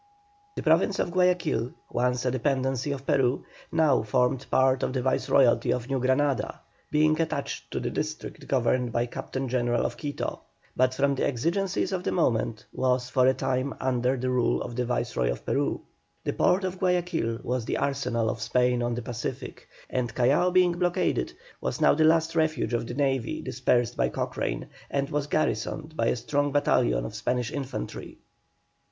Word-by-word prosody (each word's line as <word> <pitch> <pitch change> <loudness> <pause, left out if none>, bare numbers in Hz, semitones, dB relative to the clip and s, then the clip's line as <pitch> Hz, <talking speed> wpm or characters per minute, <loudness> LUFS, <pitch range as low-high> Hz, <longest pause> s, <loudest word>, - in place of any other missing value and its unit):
The - - -4
province 170 +5 +3
of - - -1
Guayaquil, 175 -10 +1 0.2
once 125 +1 0
a 125 - +2
dependency 130 +1 0
of 135 -1 -5
Peru, 135 -4 +1 0.3
now 155 -5 +3
formed 125 +4 0
part 130 0 +3
of - - -1
the 130 - 0
Viceroyalty 130 -2 +3
of 125 +2 -2
New 135 - +1
Granada, 130 +2 +1 0.3
being 155 +1 +3
attached 160 - -3
to - - -3
the - - -3
district - - -5
governed 125 -2 +1
by 120 +1 +1
the 120 - -7
Captain 135 0 -4
General 120 -1 +1
of - - -3
Quito, 145 -2 -4 0.3
but 130 0 +2
from 140 +1 +2
the 135 - -1
exigencies 175 - 0
of 185 -2 -2
the - - -1
moment 115 -9 0
was 125 -1 0
for 130 -1 +4
a 130 - +4
time 130 0 -1
again - - -18
under 125 +1 +1
the 130 +1 -1
rule 125 -2 +1
of 120 - -7
the 125 0 0
Viceroy 120 - -1
of - - -4
Peru. - - 0 0.4
The - - -1
port 190 +2 +2
of 185 0 -3
Guayaquil 175 -10 0
was 125 -1 -2
the - - -1
arsenal 135 -5 0
of 110 0 -2
Spain 125 +2 +2
on 120 0 -1
the 120 - -4
Pacific, 125 +2 -6 0.2
and, 125 -2 -2
Callao 135 +8 +3
being 180 -1 +4
blockaded, 175 - 0 0.3
was - - -2
now - - +5
the 155 +1 +3
last 160 +1 +3
refuge 155 -7 +1
of 120 0 -1
the 120 - -5
navy 135 -4 0
dispersed 120 -2 +1
by - - +2
Cochrane, - - -3 0.2
and 140 -1 -1
was 145 -1 -1
garrisoned 155 +2 -1
by 115 - +1
a - - +2
strong 145 +4 0
battalion - - +2
of - - -6
Spanish 125 -2 -1
infantry. 135 - -5
130 Hz, 180 wpm, -27 LUFS, 120-150 Hz, 0.4 s, now